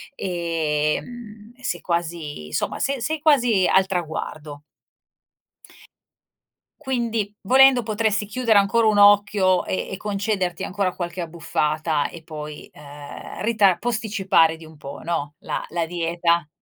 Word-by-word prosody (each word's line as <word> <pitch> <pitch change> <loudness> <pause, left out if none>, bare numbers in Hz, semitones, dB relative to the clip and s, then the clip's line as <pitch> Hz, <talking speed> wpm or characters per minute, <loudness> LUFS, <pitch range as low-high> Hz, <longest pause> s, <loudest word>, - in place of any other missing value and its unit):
ehm, 175 - -3
e 255 - -20
sei 175 -9 -2
quasi 165 - -3
insomma 75 -1 -3
se 275 -2 -1
sei 310 +5 -2
quasi 245 - +4
al 190 0 +4
traguardo. 155 -4 -5 2.2
Quindi, 230 -5 -2
volendo, 260 +3 +6
potresti 215 -1 0
chiudere 225 0 +2
ancora 220 +3 +3
un 215 - +3
occhio 205 -2 +5
e - - -2
e 190 - -4
concederti 200 -3 -2
ancora 190 -1 -2
qualche 175 0 -5
abbuffata, 155 -2 -1
e 170 - -11
poi, 150 -1 -8
ehm, 145 0 -10
rita 210 -4 +3
posticipare 210 -8 +2
di 165 - -14
un 155 -1 -15
po', 140 -1 -9
no, 155 -3 -2
la - - -4
la 170 0 -1
dieta. 170 -1 0
185 Hz, 125 wpm, -23 LUFS, 160-215 Hz, 2.2 s, volendo